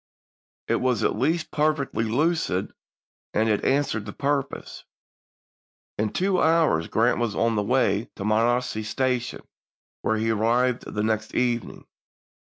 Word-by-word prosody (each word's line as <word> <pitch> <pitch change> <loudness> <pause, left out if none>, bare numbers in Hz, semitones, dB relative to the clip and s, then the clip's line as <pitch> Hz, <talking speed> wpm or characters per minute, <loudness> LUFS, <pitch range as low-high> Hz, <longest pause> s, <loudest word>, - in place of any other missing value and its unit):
It - - +2
was 125 -4 0
at - - +1
least 155 +8 0
perfectly 150 -6 0
lucid, 140 - 0 0.6
and 110 +1 +2
it 105 -2 +1
answered 135 -6 0
the 100 - -6
purpose. 140 -1 -3 1.2
In 110 0 +1
two 185 0 +1
hours 160 - +3
Grant 120 +3 +2
was 115 -3 -1
on 115 0 +1
the 105 - +1
way 105 -1 +1
to 100 - -5
Monocacy 115 +1 +1
Station, 125 +2 -2 0.6
where 110 - 0
he 110 +1 0
arrived 120 +3 +1
the 105 - -2
next 110 0 -1
evening. 120 -2 -1
120 Hz, 135 wpm, -25 LUFS, 110-135 Hz, 1.2 s, hours